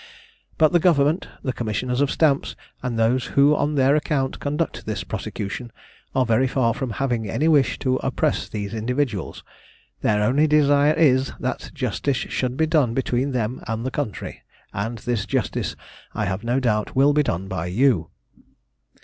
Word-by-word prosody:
But 155 -1 +4
the 175 - +4
Government, 160 -1 +2 0.2
the 130 - -1
Commissioners 125 +3 -2
of 145 - +2
Stamps, 145 -3 +1 0.3
and 125 -3 -3
those 120 +3 +2
who 145 +2 +6
on 150 +1 0
their 135 +1 +4
account 145 -3 -1
conduct 145 +1 -3
this - - -3
prosecution, 110 +4 -5 0.4
are 130 - +3
very 115 +3 +2
far 125 -3 +1
from 130 +1 -4
having 120 -6 -1
any 150 +10 0
wish 145 -4 +3
to 130 -1 0
oppress - - -1
these 105 -1 -5
individuals; 115 - -2 0.6
their 105 0 +2
only 140 +8 +3
desire 145 0 +4
is, 135 -5 +3
that - - -3
justice 140 -3 -1
should 125 0 -2
be 160 - +3
done 150 -7 +2
between 130 +1 0
them 120 -1 -2
and 115 +1 -3
the 130 - -2
country, 125 - -4 0.3
and 115 +4 -3
this 110 -2 -2
justice - - -1 0.4
I - - -1
have 95 +3 -3
no 120 +3 +1
doubt 105 -5 0
will 140 +2 +5
be 150 - +4
done 95 - -2
by 90 -3 -3
you. 100 - +2
130 Hz, 165 wpm, -23 LUFS, 115-145 Hz, 0.6 s, who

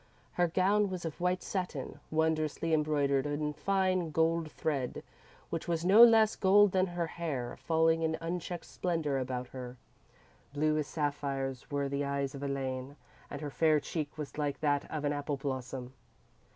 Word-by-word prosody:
Her 175 0 +2
gown 195 +4 +2
was 185 -2 -5
of 165 +1 -5
white 180 0 +1
satin, 170 -8 -4
wondrously 160 0 0
embroidered 145 -3 +2
in 150 +1 -2
fine 185 -1 +1
gold 160 0 +1
thread, 140 -6 -2 0.5
which 165 - -3
was 170 0 -1
no 205 +5 +9
less 225 -2 +6
gold 205 +1 +5
than 185 0 +2
her 175 -1 -2
hair, 155 -7 -4
falling 160 0 +2
in 160 0 0
unchecked 175 +1 -4
splendour 160 -6 -1
about 125 -1 -3
her._ 125 +2 -12
_Blue 155 0 +2
as 150 - -2
sapphires 140 -3 -3
were 140 -1 -1
the 140 +1 -1
eyes 140 -1 -2
of 140 - -7
Elaine, 135 -1 -3 0.3
and 145 - -6
her 145 -2 -4
fair 155 0 +3
cheek 150 0 -4
was 150 0 -6
like 145 -2 -1
that 145 -2 +1
of 150 -2 -3
an 145 - +1
apple 145 0 -2
blossom. 130 -2 -5
155 Hz, 165 wpm, -31 LUFS, 140-170 Hz, 0.5 s, no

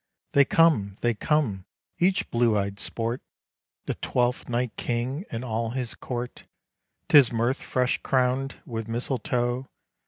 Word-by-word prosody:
They 140 -1 +6
come! 135 -13 +3
they 120 0 +2
come! 110 - 0 0.3
each 185 +2 +2
blue 115 -2 +3
eyed 100 0 -2
Sport, 115 +2 -2 0.6
The - - -1
Twelfth 125 0 -1
Night 120 0 -1
King 125 - -2
and 115 +2 -4
all 115 -1 -1
his 125 -1 -3
court 125 -1 -5 0.6
'Tis 140 -5 +7
Mirth 120 +3 0
fresh 125 -1 0
crown'd 130 +1 +1
with 115 -2 -5
misletoe! 120 +1 -1
120 Hz, 130 wpm, -26 LUFS, 115-130 Hz, 0.6 s, Tis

